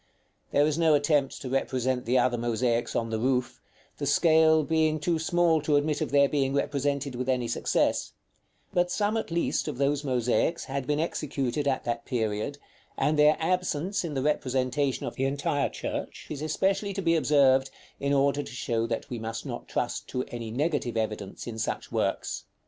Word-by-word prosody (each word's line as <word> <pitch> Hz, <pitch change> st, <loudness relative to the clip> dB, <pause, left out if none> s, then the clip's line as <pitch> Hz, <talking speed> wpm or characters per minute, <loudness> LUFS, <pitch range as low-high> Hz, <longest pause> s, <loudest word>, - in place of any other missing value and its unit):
There 145 Hz, -, +4 dB
is 155 Hz, +1 st, 0 dB
no 160 Hz, -2 st, +5 dB
attempt 145 Hz, -1 st, +1 dB
to 130 Hz, -, -4 dB
represent 130 Hz, -1 st, 0 dB
the 125 Hz, +2 st, +2 dB
other 125 Hz, -1 st, +3 dB
mosaics 120 Hz, 0 st, 0 dB
on 115 Hz, -1 st, -1 dB
the 110 Hz, -, -1 dB
roof, 125 Hz, 0 st, 0 dB, 0.4 s
the 145 Hz, -, -2 dB
scale 160 Hz, +1 st, +5 dB
being 155 Hz, +1 st, +1 dB
too 165 Hz, +2 st, 0 dB
small 165 Hz, -1 st, +2 dB
to 150 Hz, 0 st, +1 dB
admit 150 Hz, +1 st, +1 dB
of 155 Hz, -, -1 dB
their 140 Hz, +1 st, +5 dB
being 135 Hz, -1 st, 0 dB
represented 140 Hz, -1 st, -1 dB
with 125 Hz, +1 st, -3 dB
any 125 Hz, -2 st, +1 dB
success; 120 Hz, -, 0 dB, 0.6 s
but 175 Hz, 0 st, +2 dB
some 205 Hz, +3 st, 0 dB
at 225 Hz, -, -2 dB
least 170 Hz, -1 st, 0 dB
of 145 Hz, -5 st, -4 dB
those 140 Hz, +1 st, +1 dB
mosaics 125 Hz, +4 st, 0 dB
had 135 Hz, -1 st, -4 dB
been 150 Hz, 0 st, +1 dB
executed 145 Hz, -4 st, -2 dB
at 135 Hz, -2 st, 0 dB
that 120 Hz, -1 st, -2 dB
period, 110 Hz, +3 st, -2 dB, 0.4 s
and 150 Hz, 0 st, +1 dB
their 150 Hz, +1 st, +6 dB
absence 180 Hz, +2 st, 0 dB
in 160 Hz, -4 st, -4 dB
the 135 Hz, -, -1 dB
representation 135 Hz, -1 st, 0 dB
of -, -, -6 dB
the 135 Hz, -, +1 dB
entire 140 Hz, +1 st, 0 dB
church -, -, -5 dB
is 150 Hz, -2 st, -4 dB
especially 195 Hz, +6 st, 0 dB
to 195 Hz, -, -3 dB
be 165 Hz, 0 st, +3 dB
observed, 135 Hz, -3 st, +4 dB, 0.3 s
in 140 Hz, 0 st, -1 dB
order 140 Hz, +1 st, +2 dB
to 125 Hz, -, -9 dB
show 115 Hz, -2 st, -1 dB
that 115 Hz, -, -3 dB
we 120 Hz, -, -3 dB
must 115 Hz, 0 st, -5 dB
not -, -, -6 dB
trust -, -, -2 dB
to 125 Hz, -, -2 dB
any 115 Hz, -2 st, -5 dB
negative 135 Hz, -1 st, -1 dB
evidence 105 Hz, -3 st, -3 dB
in 115 Hz, -2 st, -6 dB
such 110 Hz, -, -3 dB
works. -, -, -1 dB
140 Hz, 185 wpm, -27 LUFS, 125-155 Hz, 0.6 s, their